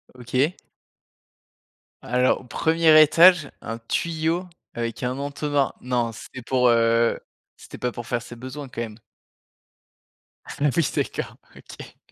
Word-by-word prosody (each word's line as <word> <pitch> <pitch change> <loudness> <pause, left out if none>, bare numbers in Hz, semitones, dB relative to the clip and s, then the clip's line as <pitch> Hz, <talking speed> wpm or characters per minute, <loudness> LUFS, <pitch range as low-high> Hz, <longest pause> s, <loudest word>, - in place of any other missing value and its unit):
OK. 130 +6 -1 1.5
Alors 125 +2 +1
au - - -14
1er 160 +4 +4
étage, 165 0 +6
un 115 0 -5
tuyau 165 +8 -2 0.3
avec 115 +1 -4
un 125 +2 -2
entonnoir? 145 0 -1
Non 120 -2 -1
c'était 125 +3 -10
pour, 125 +1 +2
heu, 115 0 +3 0.4
c'était - - -12
pas 125 - -2
pour 120 0 -8
faire 120 -1 -1
ses 120 +1 -11
besoins 130 +3 -8
quand 125 - -8
même? 110 -1 -7 1.5
Ah - - -9 0.3
oui, 165 -4 +2
d'accord, - - -3 0.2
OK. - - -13
125 Hz, 130 wpm, -23 LUFS, 120-155 Hz, 1.5 s, étage